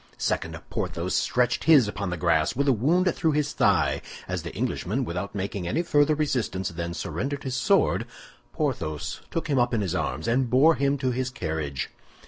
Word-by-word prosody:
Second, - - -2
Porthos 85 +2 -2
stretched 125 -1 +1
his 145 -8 +7
upon 100 -2 -3
the 90 - -3
grass 80 +5 +2
with 140 +3 0
a 135 - +5
wound 170 - +2
through 160 -2 +1
his 150 -1 0
thigh, - - +2 0.3
As - - -2
the - - -6
Englishman, 125 +8 -1
without 90 +2 -4
making 95 -2 -3
any 165 - 0
further 150 -2 +3
resistance, 125 -11 -1
then 85 0 -5
surrendered 140 +8 -3
his 130 -1 -3
sword, 125 -2 +2 0.4
Porthos 75 -1 -3
took 165 - -3
him 140 -4 +2
up 120 0 +2
in 110 - 0
his 95 -4 -1
arms 75 +5 -2
and 125 +1 +2
bore 140 +7 +6
him 140 -1 +1
to 130 -1 0
his 130 +1 -1
carriage. 75 - -3
125 Hz, 185 wpm, -26 LUFS, 90-140 Hz, 0.4 s, his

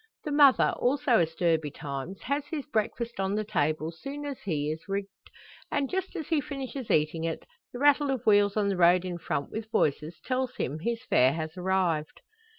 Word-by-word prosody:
The 300 - -4
mother, 285 -3 +5
also 260 -1 +3
astir 165 0 +2
betimes, 145 +3 -6
has 280 +2 -2
his 295 -3 -4
breakfast 235 -2 -2
on 195 +1 0
the 215 - 0
table 155 -6 -1
soon 275 - -7
as 280 -2 -5
he 150 -5 -2
is 160 +1 -5
rigged; 195 0 -2 0.6
and 280 -2 0
just 380 +1 -3
as 315 -5 -4
he 320 -3 +2
finishes 270 -3 -6
eating 155 +2 +1
it, 165 -1 -3 0.3
the - - -7
rattle 290 +1 +4
of 260 -3 -2
wheels 205 -1 +4
on 205 -1 +2
the 195 - -1
road 175 +1 +5
in 175 -1 -4
front, 140 - -3
with 220 0 -5
voices, 155 -3 0
tells 255 -1 -1
him 145 +5 -3
his 230 +6 -2
fare 130 - +4
has 160 +1 -4
arrived. 180 -4 -1
200 Hz, 190 wpm, -28 LUFS, 165-265 Hz, 0.6 s, mother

